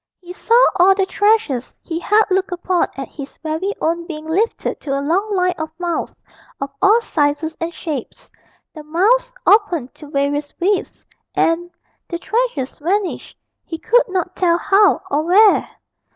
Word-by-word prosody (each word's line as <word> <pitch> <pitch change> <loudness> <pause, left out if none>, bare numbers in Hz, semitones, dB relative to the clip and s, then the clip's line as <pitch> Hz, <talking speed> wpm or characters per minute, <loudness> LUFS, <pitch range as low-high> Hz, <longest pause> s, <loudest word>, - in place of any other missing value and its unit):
He 360 -1 -10
saw 460 +5 +2 0.2
all 380 +2 +6
the 385 -1 +1
treasures 410 - 0
he 330 -1 -4
had 420 +5 +3
looked 380 +1 +1
upon 355 0 0
as 270 - -5
his 280 -1 -10
very 320 +5 -2
own 335 +1 -1
being 310 -2 -7
lifted 385 +9 -1
to 275 -1 -3
a - - -1
long 360 +9 0
line 365 -2 +1
of 315 0 -3
mouths 350 -2 -2 0.5
of 275 0 -4
all 420 +4 +5
sizes 310 -3 -1
and 330 +1 -2
shapes; 305 -8 -7 0.4
the 310 - -9
mouths 415 +12 +1
opened 345 - +2
to 300 - -13
various 290 +1 -2
widths, 385 +2 -1 0.3
and 340 +1 +1 0.4
the 340 - -3
treasures 405 - -2
vanished, 375 +5 -2 0.3
he 325 - -6
could 485 +7 +2
not 370 -1 -2
tell 345 -2 +2
how 400 +3 +3
or 290 +2 +2
where. 390 +6 +4
345 Hz, 160 wpm, -19 LUFS, 310-395 Hz, 0.5 s, all